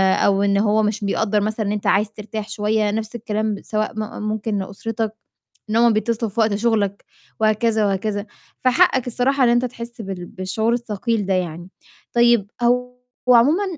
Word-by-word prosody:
أو 200 0 +2
إن 200 0 +2
هو 215 +1 +3
مش 210 0 -1
بيقدّر 210 +1 +1
مثلًا 215 +1 -1
إن 200 - -1
أنت 210 -1 -2
عايز 210 +2 +2
ترتاح 215 0 -6
شوية، 210 0 0
نَفْس 220 +2 -4
الكلام 215 -1 -2
سواء 215 0 -2
م 215 +1 -5
ممكن 215 0 -2
لأسرتك 215 +3 -4 0.6
إن 215 - -1
هم 235 0 +5
بيتّصلوا 225 0 -1
في 230 - -5
وقت 220 -2 +3
شُغلك، 205 -2 0 0.3
وهكذا 220 0 +2
وهكذا. 205 +1 -1 0.4
فحقك 255 0 +3
الصراحة 255 +3 +1
إن 240 - +5
انت 240 +1 +3
تحس 235 -1 -7
بال 190 -3 -6
بالشعور 190 +6 -1
الثقيل 230 -2 -1
ده 190 - 0
يعني. 175 -1 -3 0.4
طيب 235 -4 +3
هو 250 +1 +2 0.4
عمومًا 265 +11 +5
215 Hz, 165 wpm, -21 LUFS, 205-235 Hz, 0.6 s, هم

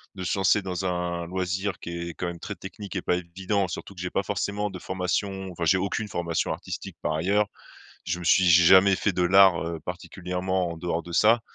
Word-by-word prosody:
de 95 - -6
se 90 - 0
lancer 95 +2 +3
dans 95 -1 -4
un 90 -1 -2
loisir 90 +1 -2
qui 85 - -7 0.2
est 85 - -7
quand - - -4
même 85 -1 -6
très 100 - -6
technique 100 +1 -7
et - - -2
pas 90 - +1
évident 95 +2 -2
surtout 100 - -7
que 90 - -8
j'ai 90 - -2
pas 95 - -1
forcément 105 +1 -2
de 95 - -7
formation, 95 +1 -2
enfin, 85 -1 -5
j'ai 95 +3 +4
aucune 100 +3 -2
formation 85 -4 -1
artistique, - - -7
par - - -1
ailleurs. 100 +6 +1 0.6
Je 80 +2 -2
me 85 - -7
suis 95 +3 +5
jamais 95 +3 +7
fait 100 - 0
de 90 - 0
l'art 95 0 +6 0.3
particulièrement 90 0 -3
en - - -8
dehors 85 0 -2
de 85 - -10
ça 110 +6 +5
95 Hz, 215 wpm, -26 LUFS, 85-95 Hz, 0.6 s, jamais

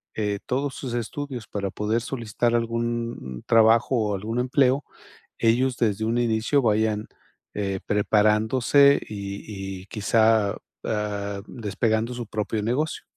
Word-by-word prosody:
eh, 105 -2 -1
todos 135 +1 -1
sus 130 -3 -5
estudios 125 +1 -4
para 100 -2 -3
poder 110 +3 -1
solicitar 120 -1 -1
algún 115 0 -1 0.2
n - - -10
trabajo 115 +3 +5
o 105 -3 +1
algún 110 +5 -3
empleo, 130 +2 +2 0.6
ellos 125 +3 +2
desde 110 -2 +1
un 115 +2 0
inicio 120 +4 +2
vayan, 110 -1 +1 0.5
eh, 95 -2 -2
preparándose, 110 +7 +4
y 100 -1 -6
y - - -16
quizá, 110 0 +2 0.3
ah, 100 -2 -2
despegando 110 +1 -1
su 120 -1 -5
propio 105 0 -2
negocio. 130 +8 -1
110 Hz, 130 wpm, -25 LUFS, 105-120 Hz, 0.6 s, trabajo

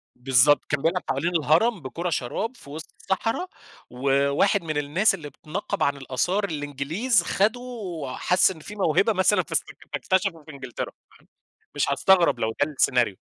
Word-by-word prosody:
بالضبط. 135 +3 +4
كان 145 -1 0
بيلعب 170 +4 0
حوالين 145 +7 -1
الهرم 170 +8 +3
بكورة 165 +6 -4
شراب 170 - -3
في 140 - -15
وِسط 160 +3 -9
الصحرا 225 - -1 0.4
وواحد 140 - +1
من 155 -2 -3
الناس 155 +10 +2
اللي 155 -5 -9
بتنقَّب 185 +8 -4
عن 140 0 +1
الآثار 140 +10 -1
الإنجليز، 160 - -1
خَدُه، 215 +7 +1 0.6
حَس 180 +1 +3
إن 170 - -10
فيه 205 +7 -10
موهبة 200 +3 +2
مثلًا 190 +2 +3
فاستك - - -3 0.2
فاكتشفه 190 -4 0
في 155 - -11
إنجلترا، 135 -4 -6 0.2
فاهم؟ - - -23 0.5
مش 145 -1 0
هاستغرب 175 -1 +4
لو 110 -1 0
ده 150 - -7
السيناريو. 125 -7 +2
155 Hz, 155 wpm, -24 LUFS, 140-190 Hz, 0.6 s, بالضبط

